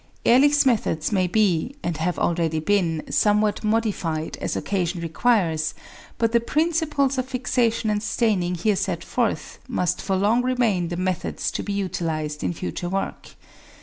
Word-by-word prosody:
Ehrlich's 285 +4 +5
methods 210 - +1
may 185 -3 +2
be 205 - +1
(and 170 -3 -2
have 170 +3 -1
already 165 -2 0
been) 165 -2 +1
somewhat 210 0 +2
modified 210 -8 -1
as - - -2
occasion 180 -3 -1
requires, 165 -2 +1 0.4
but 230 -1 +1
the 235 - +4
principles 300 -1 +1
of 255 - -2
fixation 245 -3 0
and 210 0 0
staining 200 -4 0
here 200 +4 +1
set - - -2
forth - - -2
must 180 -9 -1
for 195 -1 -1
long 210 +6 +3
remain 240 -8 +1
the 175 0 -4
methods 185 -1 -2
to - - -3
be 205 - -4
utilised 160 -6 -2
in - - 0
future 175 +1 -4
work. 195 +1 -4
200 Hz, 150 wpm, -23 LUFS, 175-235 Hz, 0.4 s, Ehrlich's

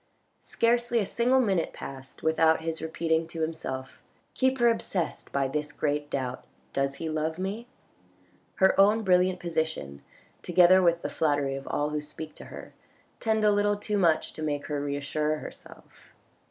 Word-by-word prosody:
Scarcely 235 +1 +1
a 215 - +2
single 245 +6 +2
minute 195 -9 +1
passed 135 -1 -10
without 160 0 +3
his 160 -1 -3
repeating 160 0 0
to 165 0 -6
himself. 135 -5 -4 0.2
" - - -39
Keep 260 0 +1
her 240 -1 +4
obsessed 205 -6 -1
by 140 -1 +1
this 150 +2 -3
great 145 -1 -2
doubt. 130 -3 -3 0.3
Does 135 0 0
he 160 - -5
love 155 +1 -2
me? 200 +6 -4 0.4
" 90 0 -35
Her 190 - +6
own 215 +3 +4
brilliant 180 -1 +3
position, 160 - -3 0.4
together 180 +1 +5
with 170 -1 +2
the - - -2
flattery 145 -3 +1
of 135 0 -6
all 145 +1 -1
who 150 0 -2
speak 155 +1 -8
to - - -10
her, - - -10 0.5
tend 220 -1 +1
a 210 - +5
little 205 0 +2
too 205 0 -1
much 165 -4 +2
to - - -8
make 145 -2 -2
her 145 -2 -2
reassure 145 +2 -1
herself. - - -13
160 Hz, 170 wpm, -28 LUFS, 145-195 Hz, 0.5 s, Her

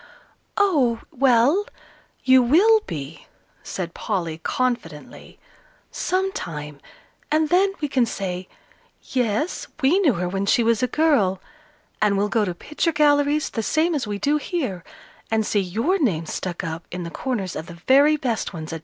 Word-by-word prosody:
"Oh, 280 - +2
well; 270 - +3 0.6
you 260 0 +6
will 375 - +5
be," 150 0 -7 0.3
said 170 -3 -5
Polly, 165 -4 -3
confidently, 175 -7 -4 0.5
"sometime, 165 - -3 0.5
and 310 0 +2
then 385 +2 +3
we 295 - 0
can 260 -4 +1
say 185 -3 -4 0.5
'yes, 245 - -1
we 305 +7 +3
knew 320 -10 +3
her 180 -1 -2
when 195 +2 -2
she 235 - +3
was 230 0 +2
a 250 - +2
girl,' 245 -12 +2 0.6
and 205 -2 +3
we'll 205 +1 +1
go 215 0 +1
to 180 -3 -4
picture 300 - -1
galleries 295 0 +2
the 225 - -2
same 320 +9 +1
as 280 -7 -2
we 205 -1 -3
do 290 +8 +1
here, 270 - -3 0.5
and 220 -1 +1
see 205 - +1
your 225 - 0
name 180 - 0
stuck 175 +3 -4
up 165 -1 -5
in 180 0 -5
the 170 - -6
corners 210 -8 -3
of 160 - -6
the 170 - -9
very 280 - +4
best 235 -8 -2
ones, 160 -1 -6
Adela." 165 - -4
235 Hz, 160 wpm, -23 LUFS, 180-300 Hz, 0.6 s, you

